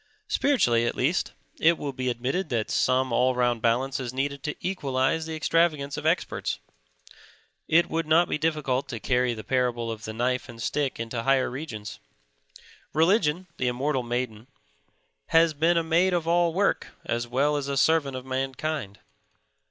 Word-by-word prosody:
Spiritually, 120 - +2
at - - -2
least, 155 +8 0 0.3
it 165 +1 +4
will 140 -2 -4
be 130 -1 -2
admitted 130 +9 -2
that 115 -3 -1
some 130 0 +2
all 125 +2 +3
round 120 -2 +1
balance 130 +4 +1
is 125 -3 -4
needed 140 +2 -2
to 150 +2 -3
equalize 150 -3 -1
the 160 - -4
extravagance 155 -2 +1
of - - -3
experts. - - 0 1.1
It 170 +2 +4
would 165 -1 -2
not 165 +2 +4
be - - -2
difficult 150 -4 0
to 120 -4 -5
carry 125 +1 +1
the 110 - -8
parable 120 -3 0
of 110 0 -7
the 110 - -5
knife 125 +3 -1
and 115 -1 -10
stick 135 +3 -1
into 115 0 -3
higher 135 +1 +2
regions. 115 -7 -7 0.9
Religion, 170 +1 +2
the 125 - 0
immortal 130 +2 0
maiden, 120 -2 -3 0.8
has 165 -1 +4
been 165 +4 +2
a 165 - +2
maid 170 +3 +2
of 165 -2 -1
all 170 0 +3
work 195 +4 +1 0.2
as 120 0 -2
well 140 +5 +1
as 145 -1 -2
a 140 -1 -2
servant 145 -2 +3
of 130 - -8
mankind. 135 -4 -3
135 Hz, 165 wpm, -26 LUFS, 125-160 Hz, 1.1 s, it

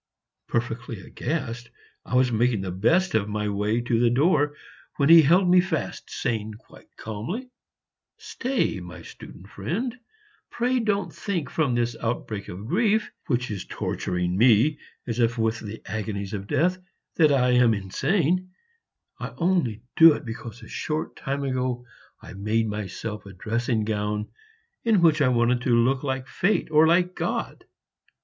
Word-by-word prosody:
Perfectly 115 -2 -3
aghast, 120 +1 -4 0.4
I - - -3
was 125 -1 +4
making 115 -2 +1
the 95 -1 -4
best 170 - +2
of 105 -2 +1
my 105 0 -2
way 105 +3 0
to 120 -1 0
the 120 0 +4
door, 145 +3 +2 0.4
when 140 0 +2
he 165 0 +10
held 175 +6 +4
me 180 0 +6
fast, 175 -4 -4
saying 110 -2 -3
quite 115 - -19
calmly, 170 - -5 0.7
"Stay, 250 - -2
my 90 0 -10
student 95 - -12
friend, 185 - -3 0.5
pray 250 +2 0
don't 205 -3 -1
think 185 -7 -3
from 145 -7 +1
this 120 0 0
outbreak 110 -3 -3
of 95 +4 -8
grief, 215 - +1 0.2
which 125 -1 -1
is 100 -3 -4
torturing 90 0 -2
me 120 +7 +4 0.3
as 120 -1 -3
if 115 0 +2
with 110 0 0
the 110 0 -8
agonies 100 -1 -4
of 100 -1 -5
death, 180 - +1 0.4
that 155 -3 +5
I 125 -2 +3
am 125 -2 +4
insane; 170 - 0 0.7
I - - -6
only 165 - 0
do 165 -1 +9
it 145 - -6
because 115 0 -8
a - - -11
short 155 0 -3
time 140 +1 -3
ago 125 -2 -2 0.4
I - - -10
made 110 +3 0
myself 105 0 -5
a 100 - -10
dressing 115 +4 -1
gown 105 0 -2 0.5
in 215 -6 +3
which 155 -2 +4
I 140 - +4
wanted 120 0 +2
to 125 -1 +2
look 130 +3 +2
like 130 -2 -3
Fate 180 0 0
or 155 +1 +6
like 175 +2 +3
God!" - - -3
120 Hz, 155 wpm, -25 LUFS, 110-160 Hz, 0.7 s, he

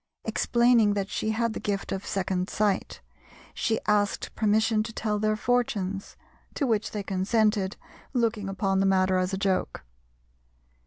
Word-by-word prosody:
Explaining 235 -3 +3
that 195 -1 -2
she 215 - -1
had 230 +1 0
the - - -4
gift 200 -1 -3
of 195 0 -4
second 185 -1 -1
sight, 205 -2 -1 0.5
she 225 -1 0
asked 205 -1 +1
permission 220 0 +2
to 220 - -4
tell 215 -2 -2
their 215 0 +1
fortunes, 215 -5 -1 0.4
to 285 - 0
which 220 -3 0
they 210 -2 -4
consented, 200 +1 +1 0.3
looking 225 -5 0
upon 195 0 0
the 195 - +3
matter 185 -1 +3
as 185 +1 0
a 190 - -2
joke. 190 -1 -1
210 Hz, 150 wpm, -27 LUFS, 195-220 Hz, 0.5 s, Explaining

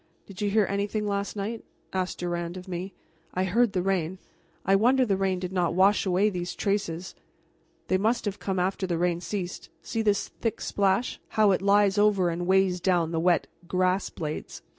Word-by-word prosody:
"Did 195 -1 -10
you 205 - +1
hear 210 0 +3
anything 205 +2 -1
last 200 0 -2
night?" 215 +3 -4 0.3
asked 185 -1 -2
Durand 175 0 -3
of 185 +1 -9
me. 185 +1 -4 0.4
"I 185 - +1
heard 215 +4 +2
the 180 -2 0
rain. 190 -2 0 0.5
I 195 - +4
wonder 250 +6 +4
the 200 -4 +1
rain 190 -1 0
did 180 0 -5
not 175 -2 +1
wash 195 +2 +4
away 190 +3 +3
these 180 -1 -4
traces." 190 -3 -2 0.7
"They 185 - +2
must 225 +4 +1
have 205 -1 -3
come 190 -1 -2
after 190 +1 0
the 170 -2 -1
rain 175 0 0
ceased. 185 -2 -5
See 225 - -2
this 205 -2 +1
thick 225 -3 -3
splash, 200 +4 0 0.2
how 215 -2 +6
it 185 - +1
lies 200 0 +4
over 200 -4 +3
and 175 +1 -3
weighs 190 -1 +3
down 175 -3 +2
the 165 - 0
wet 175 +1 +3 0.2
grass 185 +2 +1
blades. 155 -3 -6
190 Hz, 190 wpm, -27 LUFS, 180-205 Hz, 0.7 s, how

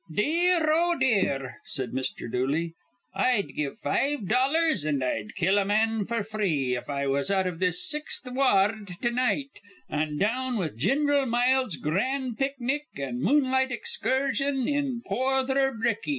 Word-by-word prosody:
"Dear, 330 - +2
oh, 340 +2 +2
dear," 140 - +1
said 130 -4 -3
Mr. 130 -1 -3
Dooley, 145 +7 -1 0.4
"I'd 245 -6 +1
give 150 +5 -3
five 270 -2 -1
dollars 275 - +2
an' 145 -3 0
I'd 110 -4 -3
kill 190 +2 +2
a - - +2
man 215 0 +1
f'r 230 -3 -2
three 165 -13 0
if 125 - -6
I 140 -1 -1
was 140 +2 0
out 190 -1 +2
iv 180 -3 -3
this 180 -1 0
Sixth 300 -2 -4
Wa 255 +2 -1 0.2
ard 205 -3 -4
to 240 - +2
night, 255 +3 0 0.4
an' 150 0 -2
down 245 - 0
with 165 - -2
Gin'ral 275 - +2
Miles' 245 -3 +2
gran' 250 - -1
picnic 275 +2 -2
an' 130 -3 -4
moonlight 260 - +2
excursion 275 - -1
in 280 -5 -1
Porther 265 +1 +1
Ricky. 225 +1 -1
235 Hz, 150 wpm, -27 LUFS, 165-270 Hz, 0.4 s, Dear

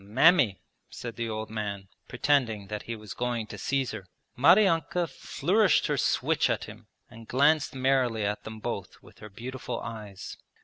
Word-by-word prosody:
'Mammy,' 125 - +4 0.3
said 115 -2 -7
the 115 -1 -3
old 110 0 -4
man, 100 -3 -4 0.2
pretending 115 -9 +1
that 105 -1 -4
he 115 - -5
was 105 -1 -9
going 120 -2 -2
to - - -9
seize 135 -2 0
her. 100 -4 -8 0.3
Maryanka 175 - +4
flourished 185 +7 +2
her - - +1
switch - - +1
at - - 0
him - - -11 0.2
and 115 0 -13
glanced 145 +3 +3
merrily 130 -5 +1
at 105 +1 -2
them 110 0 -8
both 105 -4 -5
with - - -18
her 105 - -10
beautiful 125 +3 -6
eyes. 105 -4 -8
115 Hz, 165 wpm, -28 LUFS, 105-135 Hz, 0.3 s, Mammy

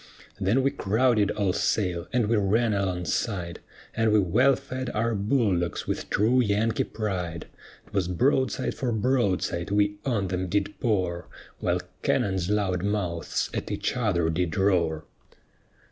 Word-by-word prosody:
Then 105 +7 +2
we 135 - +2
crowded 110 0 +2
all 100 -4 0
sail, 90 -3 0
and 120 -2 +2
we 115 - +2
ran 110 +2 +2
alongside, 90 -1 -2 0.4
And 115 -1 +2
we 105 - +5
wellfed 130 +6 +1
our 115 +2 +1
bull 105 -2 +1
dogs 85 0 -3
with - - -3
true 115 +5 +3
Yankee 110 0 +1
pride. 90 -7 -4 0.5
'Twas 95 -4 0
broadside 130 - +1
for 125 -2 -2
broadside 105 -7 0
we 105 0 +1
on 105 -8 -1
them 90 0 -2
did 100 +2 0
pour, 90 -6 -1 0.3
While - - 0 0.2
cannon's 95 -2 0
loud 100 -4 0
mouths 90 -5 -2
at - - -3
each - - -2
other 90 -9 +1
did 80 -1 -1
roar. 90 -5 +1
100 Hz, 140 wpm, -26 LUFS, 90-115 Hz, 0.5 s, we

